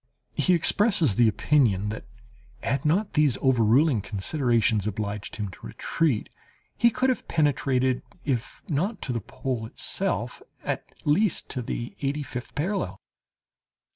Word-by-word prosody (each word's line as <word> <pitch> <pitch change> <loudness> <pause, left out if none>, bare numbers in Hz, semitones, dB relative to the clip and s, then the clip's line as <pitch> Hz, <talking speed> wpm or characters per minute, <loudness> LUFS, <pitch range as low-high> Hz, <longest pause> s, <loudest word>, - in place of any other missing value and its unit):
He 185 - +3
expresses 175 - +4
the 115 +3 +4
opinion 105 -3 +2
that, 110 - -6 0.6
had 140 +3 -1
not 190 +8 +2
these 150 -5 +3
overruling 125 +1 +4
considerations 110 0 +1
obliged 105 0 -4
him 105 -2 -3
to 90 - -10
retreat, 150 -10 0 0.5
he 235 - +5
could 255 +3 +1
have 255 - -4
penetrated, 130 -4 +1 0.2
if 125 -6 -2
not 185 +9 -1
to 125 - -2
the 115 - -2
pole 130 0 -4
itself, - - -3 0.2
at - - -3
least 175 +6 +2
to 130 - -3
the 120 0 -4
eighty 145 +2 -1
fifth 125 -3 -7
parallel. 150 - -2
130 Hz, 135 wpm, -26 LUFS, 110-155 Hz, 0.6 s, he